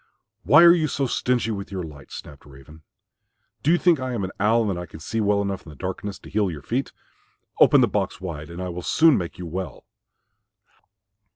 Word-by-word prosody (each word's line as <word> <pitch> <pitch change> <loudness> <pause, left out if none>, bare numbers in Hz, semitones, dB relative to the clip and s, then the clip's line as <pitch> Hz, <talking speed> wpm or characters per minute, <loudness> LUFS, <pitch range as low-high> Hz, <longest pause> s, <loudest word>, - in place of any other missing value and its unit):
"Why 140 - +6
are 170 0 +9
you 160 -3 +1
so 140 -2 -1
stingy 125 -2 0
with 100 -2 -6
your 95 -2 -4
light?" 75 -4 -11
snapped 70 0 -10
Raven. 70 +3 -15 0.8
"Do 150 - 0
you 175 - +5
think 175 -4 +3
I 130 -1 -3
am 115 - -2
an 95 - -4
owl 110 +2 +3
and - - 0
that 90 - -5
I 90 - -8
can 80 - -12
see 110 +8 -3
well 100 -1 +2
enough 100 -1 -3
in - - -13
the 75 - -11
darkness 95 +4 -5
to - - -14
heal 105 -1 +1
your 75 -4 -7
feet? 130 +4 -2 0.7
Open - - +6
the - - +4
box - - -2
wide 80 -4 -6
and 85 +2 -6
I 90 - -4
will 90 0 -5
soon 160 - +4
make 85 -3 -4
you 90 - -7
well." 90 +3 -6
95 Hz, 220 wpm, -23 LUFS, 85-120 Hz, 0.8 s, are